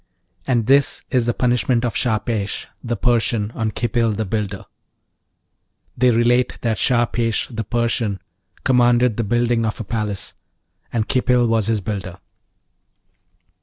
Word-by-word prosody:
AND 120 -4 +1
THIS 135 +3 +3
IS 125 -2 +2
THE 120 - +2
PUNISHMENT 125 0 +1
OF 120 - -2
SHAHPESH, 110 -3 -1 0.2
THE 120 -1 -2
PERSIAN, 115 -2 +1
ON 110 -2 -2
KHIPIL, 115 0 0
THE 110 +1 -2
BUILDER 100 -1 -3 1.3
They 125 - +3
relate 120 +1 +2
that 115 -3 -1
Shahpesh, 120 -2 +1
the 110 - -2
Persian, 115 -3 -1 0.4
commanded 120 -2 +3
the 115 - 0
building 120 +2 +1
of 110 -1 -2
a - - -3
palace, 105 -2 -3 0.6
and 110 -2 -1
Khipil 125 -1 +2
was 115 -2 +1
his 110 -2 0
builder. 95 -3 -5
115 Hz, 130 wpm, -20 LUFS, 110-120 Hz, 1.3 s, THIS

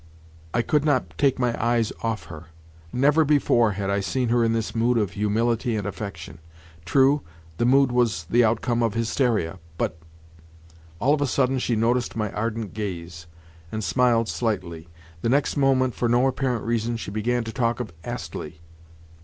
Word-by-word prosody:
I 120 - +1
could 150 +4 +1
not 150 -1 0
take 140 -2 +2
my 125 -2 0
eyes 115 -2 +1
off 115 -1 -2
her. 80 -1 -10 0.5
Never 145 +5 +3
before 125 -7 +3
had 100 0 -2
I 100 - +1
seen 120 +5 -1
her 120 0 +3
in 115 - +2
this 115 -1 -2
mood 120 +1 +2
of 105 -4 0
humility 110 +3 0
and 105 -3 -2
affection. 95 -6 -6 0.5
True, 135 +8 +4 0.4
the 120 - +2
mood 135 0 +4
was 120 -7 +1
the 120 +5 +4
outcome 115 +1 +1
of 115 -2 0
hysteria; 115 - 0 0.2
but—! 80 - -1 1.0
All 130 +8 +3
of 150 - 0
a 145 - +2
sudden 130 +1 +1
she 120 -1 0
noticed 120 +2 +1
my 105 -3 -2
ardent 110 -2 -3
gaze, 85 -5 -6 0.4
and 110 0 -3
smiled 120 -1 +2
slightly. 90 -9 -3 0.3
The 115 - 0
next 140 +3 +2
moment, 130 -3 +2
for 120 - -1
no 120 +2 +3
apparent 130 -3 -1
reason, 115 0 -1
she 105 - -6
began 120 +3 0
to 110 - -6
talk 120 -2 0
of 110 -8 -5
Astley. 80 -9 -6
115 Hz, 170 wpm, -24 LUFS, 105-125 Hz, 1.0 s, True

